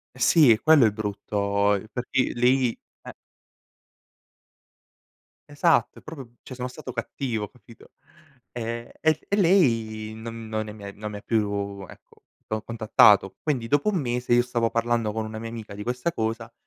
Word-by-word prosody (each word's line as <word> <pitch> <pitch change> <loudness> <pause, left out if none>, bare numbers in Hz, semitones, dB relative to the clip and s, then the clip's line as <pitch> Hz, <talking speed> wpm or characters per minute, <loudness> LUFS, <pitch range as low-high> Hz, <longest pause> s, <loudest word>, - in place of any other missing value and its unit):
Eh - - -14
sì 150 +1 +6
è 110 - +1
quello 155 -5 +6
il 110 - +3
brutto, 100 -1 -1
ehm, 100 +1 -4
perché 125 +3 -1
lei 125 0 +2 0.2
eh. - - -9 2.4
Esatto 145 +3 +2
è - - -16
proprio 135 -7 -10
cioè 130 - -9
sono 125 0 -4
stato 130 0 -9
cattivo, 115 -2 -3
capito. 115 -2 -18 0.6
Ehm, 115 0 -5
e 155 -1 +2
e 200 - +1
lei 115 - +2
non 115 0 -8
non 110 0 -3
è - - -6
mi 105 -1 -12
e 100 - -7
non 105 +1 -7
è - - -4
mi 100 - -9
più, 100 -2 -1
ecco, - - -18 0.2
co 110 0 -3
contattato. 105 -4 +4
Quindi 130 -7 -1
dopo 145 - +2
1 195 - 0
mese 120 -2 0
io 120 - +5
stavo 120 -2 -1
parlando 115 -2 0
con 110 +1 -3
una 110 0 -6
mia 115 +1 -6
amica 110 -3 -8
di 105 - -7
questa 125 +8 -2
cosa 115 -1 -3
115 Hz, 175 wpm, -25 LUFS, 110-125 Hz, 2.4 s, sì